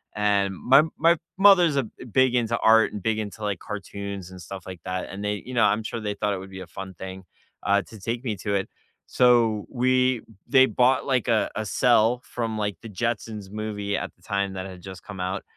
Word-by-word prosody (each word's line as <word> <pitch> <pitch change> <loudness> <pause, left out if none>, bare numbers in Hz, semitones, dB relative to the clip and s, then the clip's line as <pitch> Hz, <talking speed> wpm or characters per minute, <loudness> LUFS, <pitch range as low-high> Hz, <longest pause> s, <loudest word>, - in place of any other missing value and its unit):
and 100 -2 +1
my 135 +9 +5 0.2
my 170 0 +4 0.2
mother's 190 -6 +6
a 135 - +2
b 115 - -12
big 130 +2 +3
into 115 -1 +1
art, 110 0 +5
and 105 - -6
big 110 -1 0
into, 105 0 -6
like, 100 -4 -2
cartoons, 100 -2 -6
and 90 -1 -10
stuff 95 +3 -8
like 90 -3 -9
that, 90 0 -3
and 100 +2 -7
they 105 -1 -2
you 130 - -7
know, 120 - +3
I'm 105 +2 +2
sure 115 - -4
they 105 -2 -3
thought 100 0 -1
it 95 - -3
would 95 +1 -10
be 95 -1 -9
a 90 - -9
fun 95 -1 -8
thing, 95 +2 -8 0.4
uh, 100 +1 +3
to 110 - -13
take 115 +5 -3
me 110 -5 -2
to 100 +3 -2
it, 95 -1 -1 0.4
so 115 -4 +3
we 130 -1 +2 0.3
they 130 -1 +6
bought, 130 +1 +2
like, 130 -4 0
a 115 -3 +2
a 110 - -2
cell 120 +1 +3
from, 115 -2 -3
like, 105 -4 -2
the 115 - -9
Jetsons 105 -1 -3
movie 105 -1 -3
at - - -5
the - - -33
time 100 -1 -1
that 95 0 -5
had 95 -2 -9
just 95 +1 -10
come 95 -2 -9
out, 90 +1 -3
105 Hz, 225 wpm, -25 LUFS, 95-120 Hz, 0.4 s, mother's